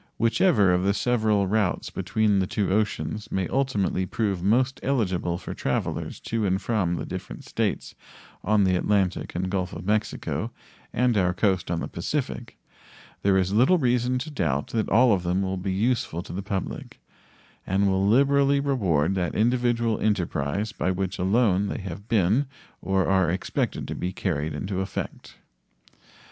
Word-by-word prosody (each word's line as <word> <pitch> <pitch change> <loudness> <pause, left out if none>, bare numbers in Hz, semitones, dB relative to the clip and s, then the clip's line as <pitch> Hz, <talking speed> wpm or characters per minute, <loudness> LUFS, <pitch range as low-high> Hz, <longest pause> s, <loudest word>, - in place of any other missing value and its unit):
Whichever 115 - +3
of 90 - +2
the 100 +1 +1
several 110 -3 +2
routes 100 -1 0
between 105 -2 +1
the 95 - 0
two 105 -5 -1
oceans 105 +1 -1
may 95 -2 0
ultimately 105 -8 0
prove 100 -5 -1
most 125 +7 +2
eligible 95 -10 0
for - - -7
travelers - - -2
to 115 -1 -2
and 95 -1 +1
from 95 -4 0
the - - -4
different 95 0 -7
States - - -2 0.5
on 105 +1 +3
the 95 -1 +3
Atlantic 95 -1 0
and 90 +2 -1
Gulf 95 -1 -2
of - - -7
Mexico 105 +1 -1 0.4
and 125 0 +2
our 90 -2 +2
coast 95 -2 +1
on 85 -1 -1
the - - -3
Pacific, - - -4 0.6
there 100 -1 +3
is 95 +1 +1
little 130 - +5
reason 125 -3 +1
to 150 +5 -5
doubt 75 - -1
that 110 -2 -1
all 120 +2 +5
of 95 - +1
them 90 +2 0
will 95 0 -2
be 95 +1 -3
useful 100 -4 0
to - - -9
the 95 - -3
public, 95 -1 -5 0.7
and 100 +2 +2
will 95 0 +2
liberally 140 +5 +4
reward 95 - +1
that 90 -4 -2
individual 120 0 +1
enterprise 100 -1 -1
by 95 - -2
which 95 0 -2
alone 100 0 +2
they - - -4
have 95 +1 -7
been 110 +6 +2 0.3
or 95 +1 +1
are 95 -3 +3
expected 90 +3 -2
to - - -4
be 90 - -3
carried 75 -4 -2
into 95 +4 -3
effect. 95 - -6
100 Hz, 165 wpm, -25 LUFS, 95-115 Hz, 0.7 s, little